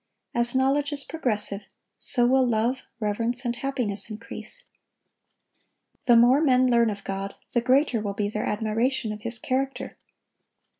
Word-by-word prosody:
As 240 +1 +1
knowledge 275 +3 +2
is 285 -1 -2
progressive, 210 -10 -1 0.4
so 240 -2 +3
will 260 +2 +4
love, 240 +2 0 0.2
reverence, 230 +4 0
and 240 0 -1
happiness 240 -7 0
increase. 230 - -7 1.4
The 240 -2 +7
more 250 +5 +6
men 255 -4 +4
learn 235 -2 +4
of 200 -1 -6
God, 195 0 -4 0.2
the 240 - +2
greater 255 -1 +2
will 200 -2 -3
be 205 0 0
their 210 +1 -3
admiration 225 +2 -1
of 210 0 -7
His 235 +2 -5
character. 265 +4 -3
240 Hz, 145 wpm, -25 LUFS, 215-260 Hz, 1.4 s, The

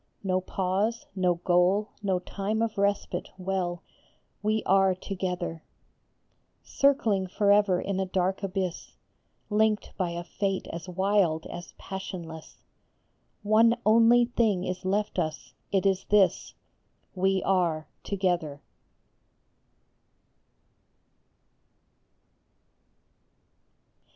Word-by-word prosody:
No 185 -1 +1
pause, 195 +5 -1
no 180 -2 +2
goal, 180 +4 +2
no 195 -3 +1
time 200 +4 -2
of 220 -3 -3
respite, 200 0 -1
well, 185 -2 -2 0.6
We 215 +1 0
are 190 0 +3
together! 180 -3 -4 1.0
Circling 230 -9 +2
forever 200 -1 +3
in 195 0 -2
a 190 - -1
dark 185 +1 0
abyss, 190 -3 -4 0.6
Linked 215 0 +1
by 185 -3 0
a 170 0 -5
fate 195 +1 -2
as 170 +2 -7
wild 185 -3 +1
as 175 0 -9
passionless, 175 -4 -7 0.9
One 225 +3 +4
only 230 +2 +6
thing 220 -6 +1
is 185 +1 -4
left 205 0 0
us, 155 -2 -4 0.2
it 195 -1 +1
is 190 -1 +2
this: 205 -2 +2 0.6
We 190 0 +1
are 170 -5 +1 0.2
together 175 -7 -1
190 Hz, 95 wpm, -27 LUFS, 180-205 Hz, 1.0 s, only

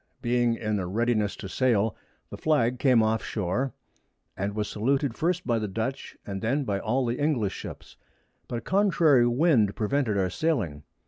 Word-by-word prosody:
Being 120 -1 +2
in 105 -2 -2
a 90 - -3
readiness 110 +1 0
to - - -7
sail, 110 -1 +1 0.4
the - - -6
Flag 125 -6 +1
came 125 -5 +4
off 110 +1 0
Shore, 110 +7 -2 0.6
was 105 +2 -2
saluted 135 +4 0
first 175 +6 -1
by 115 -2 +1
the 105 - -2
Dutch, 110 +7 -4
and 95 -1 -5
then 135 +6 0
by 100 -5 -1
all 125 +6 0
the 120 +1 -2
English 140 -10 +1
Ships; - - -9 0.5
but 120 - -3
a - - -5
contrary 160 -10 +3
Wind 120 - +3
prevented 110 -1 0
our 95 -2 0
sailing. 110 - -1
115 Hz, 170 wpm, -27 LUFS, 105-135 Hz, 0.6 s, came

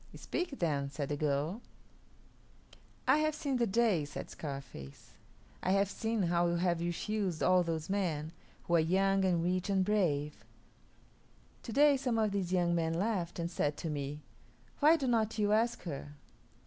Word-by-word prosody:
"Speak, 345 -6 -4
then," 145 -5 0
said 140 0 -4
the 145 - -1
girl. 150 - -1 1.5
"I - - +5
have 310 0 +1
seen 285 -4 -1
the 235 -1 +1
days," 195 -8 +2
said - - -6
Scarface. 135 - -8 0.5
"I 185 - +1
have 195 0 +2
seen 225 -2 -1
how 175 0 +2
you 170 - 0
have 170 -1 +1
refused 175 +1 -2
all 185 0 +5
those 165 -2 -3
men, 165 -6 -1 0.3
who 175 - -3
are - - +4
young 195 +4 +2
and 175 -3 +2
rich 180 +2 -1
and 190 -1 +2
brave. 150 -8 0 1.2
To 235 - -7
day 285 +3 +5
some 255 -4 -1
of 215 -2 +2
these 190 -3 -2
young 175 -2 +2
men 165 -1 0
laughed 185 -2 -1
and 170 0 -3
said 145 -4 -1
to 165 - -4
me, 145 0 -4 0.6
'Why 305 +3 +6
do 280 - -3
not 225 -3 +1
you 205 -1 +1
ask 230 +2 +1
her?' 145 -3 -6
180 Hz, 170 wpm, -32 LUFS, 160-215 Hz, 1.5 s, Why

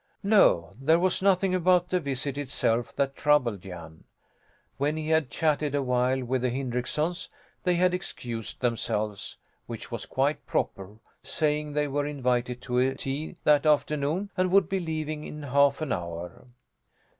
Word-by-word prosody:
No, 195 - +4
there 160 +4 +4
was 185 +1 +1
nothing 190 -1 +3
about 180 0 +3
the 180 - +2
visit 140 -2 -3
itself 120 -4 -1
that 135 -1 0
troubled 125 -10 +2
Jan. 85 -4 -10 0.7
When 145 +3 0
he 155 0 -3
had 160 -4 +2
chatted 150 0 0
a 140 - +1
while 125 +1 +1
with 130 +1 -1
the 125 - +1
Hindricksons 130 +7 -2 0.3
they 180 -1 +2
had 180 +1 +3
excused 120 -10 -5
themselves 110 -4 -2 0.3
which - - -7
was - - -5
quite - - 0
proper 95 +2 -2 0.3
saying 150 -1 -1
they 150 0 +1
were 145 +1 -1
invited 125 -3 -1
to 125 -1 0
a 130 +1 +2
tea 140 +3 -4
that 150 +1 +4
afternoon 150 +5 +1
and 185 -1 +1
would 190 -2 +4
be 195 - -1
leaving 155 -3 -3
in 150 -1 -8
half 140 +1 +3
an 155 -4 -2
hour. 85 +4 -5
145 Hz, 155 wpm, -27 LUFS, 125-160 Hz, 0.7 s, No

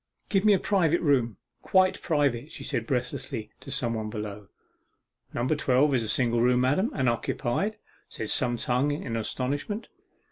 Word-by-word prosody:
'Give 195 -3 +2
me 210 -1 +6
a - - +5
private 175 -5 +2
room 125 - +2 0.2
quite 185 -1 +3
private,' 145 -3 0
she - - -7
said - - -2
breathlessly 120 -5 -3
to - - -11
some 130 -4 0
one 110 -1 -3
below. 105 -2 -6 0.8
'Number 130 +6 0
twelve 140 0 +3
is 125 - +3
a 110 - -3
single 120 -2 +2
room, 125 +1 +4
madam, 145 - +2
and - - -3
unoccupied,' 125 - 0 0.3
said 110 - -4
some 120 -2 +1
tongue 125 +4 +1
in 145 -5 -3
astonishment. 140 - -2
130 Hz, 165 wpm, -27 LUFS, 120-150 Hz, 0.8 s, me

